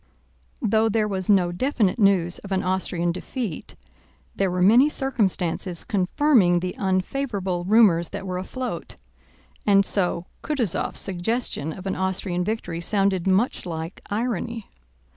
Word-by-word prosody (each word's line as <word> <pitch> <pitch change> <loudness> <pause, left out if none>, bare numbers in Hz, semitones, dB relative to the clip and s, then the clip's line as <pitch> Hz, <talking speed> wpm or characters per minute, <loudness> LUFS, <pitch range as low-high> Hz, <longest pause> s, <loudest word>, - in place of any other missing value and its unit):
Though 220 +1 +3
there 215 0 +1
was 190 -2 -3
no 185 -4 +4
definite 220 0 0
news 190 -4 +3
of 200 - -11
an 190 - 0
Austrian 180 -2 0
defeat, 195 - -5 0.6
there 195 -1 +1
were 180 0 0
many 240 +9 +6
circumstances 190 - 0
confirming 195 -1 +3
the 180 +1 -4
unfavorable 190 -1 -1
rumors 190 -5 +4
that - - -6
were 180 -1 -3
afloat, 255 +7 -5 0.7
and 200 -1 +4
so 180 -3 0 0.2
Kutúzov's 250 - -1
suggestion 190 - -2
of 185 +4 -9
an 190 - -1
Austrian 190 -1 -1
victory 180 -5 -3
sounded 195 -1 +1
much 195 +6 +2
like 165 0 -6
irony. 225 0 -2
190 Hz, 130 wpm, -24 LUFS, 180-220 Hz, 0.7 s, many